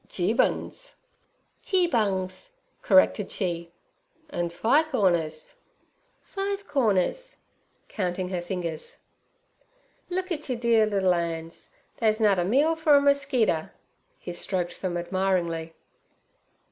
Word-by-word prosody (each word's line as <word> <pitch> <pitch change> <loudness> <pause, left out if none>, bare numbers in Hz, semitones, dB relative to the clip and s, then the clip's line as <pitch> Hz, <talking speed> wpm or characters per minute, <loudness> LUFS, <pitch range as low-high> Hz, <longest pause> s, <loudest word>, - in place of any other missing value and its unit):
'Geebun's.' 225 - -1 0.7
'Geebungs' 230 - 0 0.3
corrected 190 0 +4
she. 170 -3 -3 0.6
'An' 175 -7 -2
fi' 225 - +3
corners.' 170 - -1 0.7
'Five 400 0 -4
corners' 270 - 0 0.5
counting 180 -2 -3
her 180 -2 -2
fingers. 175 -3 -5 1.1
'Look 370 +1 -3
et 300 -4 -4
yer 250 - 0
dear 230 -2 +3
liddle 195 -3 +2
'ands! 165 -1 -4 0.3
They's 220 -1 +1
nut 205 -4 +3
a - - +2
meal 280 - +2
for 315 -2 +4
a - - +7
merskeeter.' 280 - +1 0.5
He 175 - -7
stroked 180 0 -3
them 180 -2 -2
admiringly. 175 -3 -1
195 Hz, 105 wpm, -26 LUFS, 175-280 Hz, 1.1 s, a